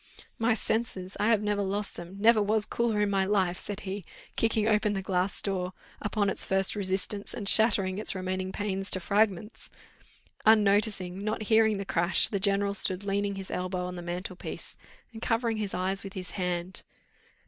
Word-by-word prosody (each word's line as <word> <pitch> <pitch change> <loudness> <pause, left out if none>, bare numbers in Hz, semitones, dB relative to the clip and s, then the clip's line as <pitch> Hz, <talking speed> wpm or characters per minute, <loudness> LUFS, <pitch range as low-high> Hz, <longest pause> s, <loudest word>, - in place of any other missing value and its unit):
"My 225 0 +2
senses! 210 -4 -2
I 210 - +2
have 225 -2 +3
never 205 -1 0
lost 200 +1 -2
them; 175 +2 -9
never 220 +1 +5
was 210 +1 +1
cooler 230 -3 0
in 205 -1 +1
my 195 -1 +2
life," 190 -3 +1
said 205 -2 -6
he, 195 0 -5 0.3
kicking 225 -1 +1
open 210 -1 +2
the 195 -1 -3
glass 185 0 0
door 185 -2 -2 0.3
upon 205 0 0
its - - 0
first 195 +1 +3
resistance, 200 +1 -1
and 205 -4 -5
shattering 200 -3 +5
its 215 - 0
remaining 185 0 -3
panes 195 -1 -2
to 185 - +1
fragments. 205 +2 0 0.7
Unnoticing, 205 -3 +3
not 215 +1 -2
hearing 220 -1 +3
the 195 - -4
crash, 175 0 +2
the 200 - -1
general 200 +1 +2
stood 190 -1 +3
leaning 200 0 -1
his 195 -1 -7
elbow 180 0 -3
on 180 - -5
the 175 - -7
mantel 175 +2 -5
piece, - - -7 0.4
and 225 - -9
covering 230 -1 0
his 210 -2 -3
eyes 190 +2 -1
with 195 -1 -8
his 185 -1 -6
hand. 180 -1 -3
200 Hz, 180 wpm, -28 LUFS, 185-210 Hz, 0.7 s, never